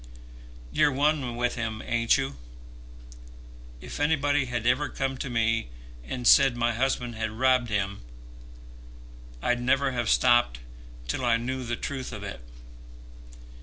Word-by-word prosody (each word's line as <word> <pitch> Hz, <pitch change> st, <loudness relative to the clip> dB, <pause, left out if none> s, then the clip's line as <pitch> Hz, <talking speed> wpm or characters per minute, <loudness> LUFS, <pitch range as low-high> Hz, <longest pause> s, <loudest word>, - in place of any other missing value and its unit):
"You're 145 Hz, -, +3 dB
one 140 Hz, -3 st, 0 dB
with 120 Hz, 0 st, 0 dB
him, 110 Hz, -2 st, -4 dB
ain't 115 Hz, +1 st, +2 dB
you? 135 Hz, -, -3 dB, 1.5 s
If -, -, -8 dB
anybody 145 Hz, -2 st, +2 dB
had 120 Hz, -2 st, -3 dB
ever 130 Hz, +4 st, +2 dB
come 135 Hz, 0 st, -2 dB
to 140 Hz, -, -4 dB
me 115 Hz, -, 0 dB, 0.3 s
and 120 Hz, -, -5 dB
said 135 Hz, -1 st, +6 dB
my 120 Hz, 0 st, +1 dB
husband 125 Hz, 0 st, -1 dB
had 110 Hz, 0 st, -3 dB
robbed 125 Hz, +2 st, +2 dB
him, 100 Hz, -1 st, -2 dB, 1.4 s
I'd 125 Hz, 0 st, +1 dB
never 135 Hz, +2 st, +2 dB
have 120 Hz, -3 st, -2 dB
stopped 120 Hz, -, +3 dB, 0.5 s
till 70 Hz, -, -2 dB
I 120 Hz, -1 st, +3 dB
knew 130 Hz, +2 st, -4 dB
the 120 Hz, -1 st, -3 dB
truth 130 Hz, +1 st, -5 dB
of 105 Hz, -3 st, -7 dB
it. 100 Hz, -11 st, -7 dB
120 Hz, 135 wpm, -27 LUFS, 115-135 Hz, 1.5 s, said